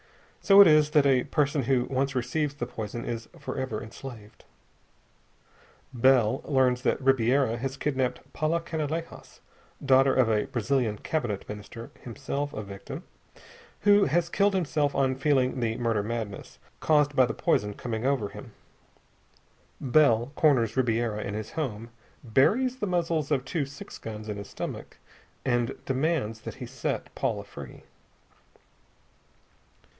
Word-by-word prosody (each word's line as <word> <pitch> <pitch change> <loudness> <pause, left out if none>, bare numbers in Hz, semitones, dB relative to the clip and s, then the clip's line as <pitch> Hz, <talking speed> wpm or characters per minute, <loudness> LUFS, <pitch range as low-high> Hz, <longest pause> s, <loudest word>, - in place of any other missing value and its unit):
And - - -14
so 195 0 +8
it - - +10
is 155 -1 +5
that 150 -1 +4
a 130 -3 +3
person 145 -2 +1
who 125 0 +2
once 135 +1 -1
receives 140 +4 -1
the 120 - -3
poison 115 0 -6
is 115 -1 -5
forever 130 -5 -4
enslaved. 110 -2 -10 1.5
Bell 130 -1 +3
learns 130 -3 +2
that - - +1
Ribiera 130 -2 +2
has 135 +2 -4
kidnapped 130 -4 -1
Paula 155 +2 0
Canalejas, 160 0 -5 0.5
daughter 135 0 +5
of 130 -3 +4
a 105 -1 +1
Brazilian 120 -2 0
cabinet 120 -7 -3
minister 105 +3 -8
himself 140 +4 -4
a 110 - -5
victim 100 0 -8 0.8
who 205 -1 +5
has 170 +4 +1
killed 200 +2 +2
himself 150 -5 0
on 135 -1 +2
feeling 130 -2 +1
the 115 -2 -1
"murder 115 -3 0
madness," 110 -2 -5 0.2
caused 150 -2 +2
by 130 -2 +5
the 110 - -4
poison, 105 -1 0
coming 115 -2 -4
over 130 -6 0
him. - - -11 1.3
Bell 130 -3 +3
corners 130 -8 +3
Ribiera 115 -4 0
in 100 - -4
his 110 0 -5
home, 115 -7 -4 0.3
buries 215 - +2
the 210 - -2
muzzles 165 -4 0
of 135 -4 0
two 155 -6 -2
six 140 0 -10
guns 110 -1 -7
in 105 -1 -4
his 100 -1 -8
stomach, - - -7 0.5
and 120 -2 0
demands 135 -5 -1
that - - -7
he 130 - -7
set 125 0 -4
Paula - - -2
free. - - -11
130 Hz, 140 wpm, -27 LUFS, 115-145 Hz, 1.5 s, it